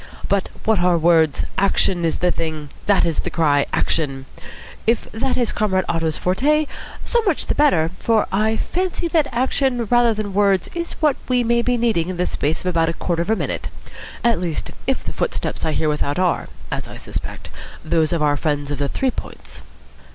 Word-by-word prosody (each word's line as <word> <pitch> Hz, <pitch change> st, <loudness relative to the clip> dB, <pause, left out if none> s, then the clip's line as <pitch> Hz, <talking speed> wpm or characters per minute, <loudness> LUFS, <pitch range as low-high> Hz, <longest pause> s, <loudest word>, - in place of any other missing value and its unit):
But 200 Hz, -1 st, 0 dB, 0.2 s
what 220 Hz, -3 st, +3 dB
are 175 Hz, -1 st, +3 dB
words? 160 Hz, -2 st, +3 dB
Action 190 Hz, -2 st, +2 dB
is 165 Hz, -, 0 dB
the 180 Hz, 0 st, +2 dB
thing. 155 Hz, -4 st, -4 dB, 0.2 s
That 200 Hz, -3 st, +4 dB
is 165 Hz, -3 st, -1 dB
the -, -, -1 dB
cry. 145 Hz, -4 st, +2 dB
Action. 135 Hz, -4 st, -1 dB, 0.6 s
If 230 Hz, 0 st, +3 dB
that 255 Hz, +4 st, -1 dB
is 240 Hz, -3 st, +1 dB
Comrade 190 Hz, -3 st, +1 dB
Otto's 165 Hz, -2 st, -1 dB
forte, 295 Hz, +12 st, +2 dB, 0.4 s
so 475 Hz, -, +2 dB
much 390 Hz, -9 st, 0 dB
the -, -, 0 dB
better, 170 Hz, -, +3 dB
for 225 Hz, -2 st, +2 dB
I 215 Hz, +3 st, +1 dB
fancy 360 Hz, +3 st, -2 dB
that 315 Hz, -4 st, +2 dB
action 255 Hz, 0 st, 0 dB
rather 240 Hz, -2 st, +4 dB
than 210 Hz, -2 st, -4 dB
words 195 Hz, -2 st, +2 dB
is 340 Hz, 0 st, -4 dB
what 300 Hz, -4 st, +1 dB
we 250 Hz, -1 st, +3 dB
may 235 Hz, 0 st, +2 dB
be 245 Hz, 0 st, +1 dB
needing 220 Hz, -8 st, +1 dB
in 185 Hz, -, -4 dB
the 180 Hz, -, +1 dB
space 155 Hz, +3 st, -1 dB
of -, -, -13 dB
about 165 Hz, -2 st, +2 dB
a -, -, -1 dB
quarter 170 Hz, 0 st, -1 dB
of 170 Hz, -, -3 dB
a 220 Hz, -, +4 dB
minute. -, -, -3 dB, 0.6 s
At 235 Hz, -5 st, +3 dB
least, 170 Hz, -4 st, -3 dB, 0.2 s
if -, -, 0 dB
the -, -, -5 dB
footsteps -, -, -2 dB
I 160 Hz, -, 0 dB
hear 155 Hz, -, 0 dB
without 150 Hz, 0 st, -1 dB
are, 180 Hz, -1 st, +1 dB, 0.2 s
as -, -, -3 dB
I -, -, -9 dB
suspect, -, -, -6 dB, 0.4 s
those 160 Hz, -1 st, +2 dB
of 165 Hz, -3 st, 0 dB
our 145 Hz, -1 st, +2 dB
friends 145 Hz, -1 st, -1 dB
of 145 Hz, -, -3 dB
the 140 Hz, -1 st, 0 dB
Three 265 Hz, -, 0 dB
Points." -, -, -9 dB
185 Hz, 200 wpm, -21 LUFS, 160-235 Hz, 0.6 s, That